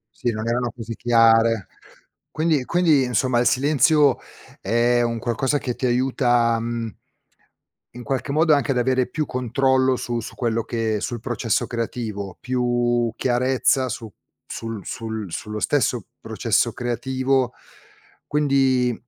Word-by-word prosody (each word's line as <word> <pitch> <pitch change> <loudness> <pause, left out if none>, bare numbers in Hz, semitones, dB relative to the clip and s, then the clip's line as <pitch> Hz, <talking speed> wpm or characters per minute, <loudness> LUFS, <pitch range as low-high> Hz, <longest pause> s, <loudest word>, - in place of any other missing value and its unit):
Sì, 120 - -1
non 110 0 -4
erano 120 0 0
così 115 -1 -6
chiare. 115 -3 +3 0.6
Quindi 155 -4 0
quindi, 165 -3 +3
insomma, 125 0 +1
il 120 - +1
silenzio 140 +1 +3 0.4
è 120 +3 +2
un 115 -1 -1
qualcosa 125 +5 0
che 125 -3 -3
ti 130 - -2
aiuta, 120 -2 +2
mhmm 115 -1 -3 1.0
in 125 - -9
qualche 130 +3 -2
modo 155 +1 +4
anche 145 -1 +1
ad 130 - 0
avere 130 +1 +1
più 155 -2 -2
controllo 130 +1 +1
su 120 -1 -3
su 110 - -8
quello 115 -2 -1
che 115 -2 -2
sul 120 +3 -4
processo 115 -2 -1
creativo, 110 -5 -4
più 120 -2 0
chiarezza 130 +1 +1
su 115 -2 -6 0.3
sul 115 -4 -6
sul 110 -4 -5
sullo 105 +4 -5
stesso 125 -5 0
processo - - 0
creativo, 130 +1 -1 0.7
quindi, 135 -4 +2
120 Hz, 130 wpm, -22 LUFS, 115-130 Hz, 1.0 s, modo